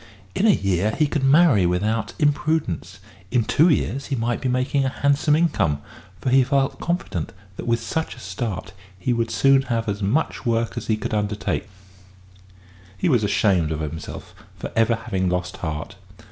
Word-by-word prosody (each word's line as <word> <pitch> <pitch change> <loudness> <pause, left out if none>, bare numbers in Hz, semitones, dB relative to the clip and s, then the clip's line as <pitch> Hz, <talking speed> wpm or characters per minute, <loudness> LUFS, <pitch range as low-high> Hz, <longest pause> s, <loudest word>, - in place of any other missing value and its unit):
In 215 - +2
a - - +6
year 100 - +2
he 155 - +4
could 145 -1 -1
marry 135 - +5
without 105 +5 -1
imprudence; 145 - 0 0.3
in 120 0 +2
two 150 - +3
or - - +6
three 160 - +5
years 140 +1 -3
he 140 - -1
might 120 0 -1
be 130 - 0
making 130 +2 +1
a 135 - +1
handsome 140 +2 +2
income, 110 - +1 0.4
for 130 - -1
he 130 0 +6
felt 135 0 0
confident 170 - -3 0.2
that, - - -6
with 115 0 +2
such 160 0 -3
a - - -13
start, 95 -1 -5 0.2
he 120 +7 0
would 115 -1 0
soon 135 +5 +4
have 115 -1 0
as 100 0 -2
much 110 +11 0
work 115 -2 0
as - - -5
he 110 - +1
could 110 - -4
undertake. 105 0 -2 1.3
He 170 - +1
was 120 -7 +3
ashamed 95 -5 +2
of 80 - -2
himself 80 +1 -7 0.2
for - - -6
ever 115 +1 +3
having 110 -5 -2
lost 90 0 -2
heart. 80 -3 -5
115 Hz, 185 wpm, -23 LUFS, 100-140 Hz, 1.3 s, a